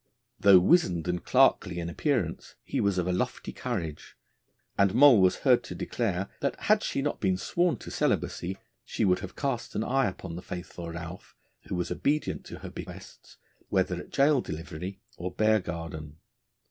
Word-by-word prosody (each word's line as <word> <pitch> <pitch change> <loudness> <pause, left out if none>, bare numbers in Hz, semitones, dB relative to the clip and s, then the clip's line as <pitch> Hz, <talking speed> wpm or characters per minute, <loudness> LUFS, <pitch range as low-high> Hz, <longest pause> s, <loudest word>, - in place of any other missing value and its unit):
Though 100 -1 +8
wizened 90 - +3
and 90 0 -1
clerkly 85 - +3
in 85 -1 -3
appearance, 95 - -2
he - - -2
was 100 -2 +1
of 90 - +1
a 90 - 0
lofty 90 - -2
courage; 85 -12 -5 0.6
and 100 +1 +3
Moll 130 -5 +8
was 95 -1 +4
heard - - +5
to - - -7
declare 100 -5 -2
that 140 - -2
had 215 0 +3
she 135 - -2
not 145 - -2
been 95 -2 +2
sworn 175 - +1
to - - -9
celibacy, 95 +2 -1 0.3
she - - -1
would 90 -1 +3
have 95 0 -8
cast 135 -5 -3
an 110 - 0
eye 135 0 +2
upon 90 -2 -6
the 90 - -6
faithful 90 -1 -7
Ralph, 85 +2 -8 0.3
who - - -3
was 90 -1 -2
obedient 150 +2 -1
to - - -8
her - - -7
behests - - -10 0.3
whether - - +1
at - - -9
Gaol 140 -1 +4
Delivery 85 +3 -6 0.2
or 90 +2 -3
Bear 110 +3 +3
Garden. 80 -4 -6
95 Hz, 175 wpm, -28 LUFS, 85-120 Hz, 0.6 s, Though